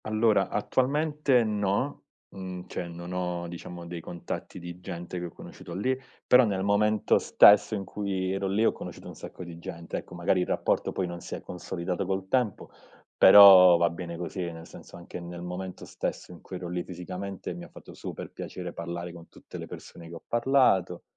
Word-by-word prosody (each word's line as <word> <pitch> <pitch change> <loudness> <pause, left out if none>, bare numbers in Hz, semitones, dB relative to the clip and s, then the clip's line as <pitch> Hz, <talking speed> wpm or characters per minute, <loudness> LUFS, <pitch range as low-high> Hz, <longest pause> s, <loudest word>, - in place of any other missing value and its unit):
Allora, 110 -2 +2
attualmente 140 +3 +1
no. 105 +5 -1 0.3
Mhmm, 90 -1 -7
cioè, 85 - -5
non 85 +1 -8
ho 90 -1 -2
diciamo 85 0 -8
dei 85 0 -6
contatti 85 +2 -6
di 85 0 -8
gente 90 0 -6
che 90 - -4
ho - - -5
conosciuto - - -10
lì. 130 +7 0 0.3
Però 125 +1 +7
nel 100 -4 0
momento 105 +1 +3
stesso 105 +1 +6
in 100 - -3
cui 95 -2 -2
ero 95 0 -1
lì, 100 +4 +2
ho - - +5
conosciuto - - -9
un - - -8
sacco - - -9
di 85 -1 -9
gente. 85 0 -6
Ecco, 90 - -8
magari 85 +1 +1
il - - -1
rapporto - - 0
poi 95 - -1
non 85 -1 -6
si - - -6
è - - -8
consolidato 90 +1 -4
col 95 0 -2
tempo, 120 -2 -1 0.4
però 95 -3 +10
va 85 0 +2
bene 85 0 -6
così, 90 +2 -5
nel 80 0 -10
senso - - -13
anche 85 +1 -8
nel 85 0 -8
momento 90 +1 -6
stesso - - -5
in 85 - -12
cui 95 - -9
ero 90 -1 -5
lì 90 0 -2
fisicamente 90 +1 -6
mi 85 0 -8
ha - - -11
fatto - - -13
super - - -7
piacere 90 -1 -7
parlare 85 +1 -5
con 85 -1 -13
tutte - - -11
le - - -7
persone 85 -1 -11
che 85 - -9
ho 85 - -11
parlato, 120 -8 +2
90 Hz, 195 wpm, -28 LUFS, 85-100 Hz, 0.4 s, però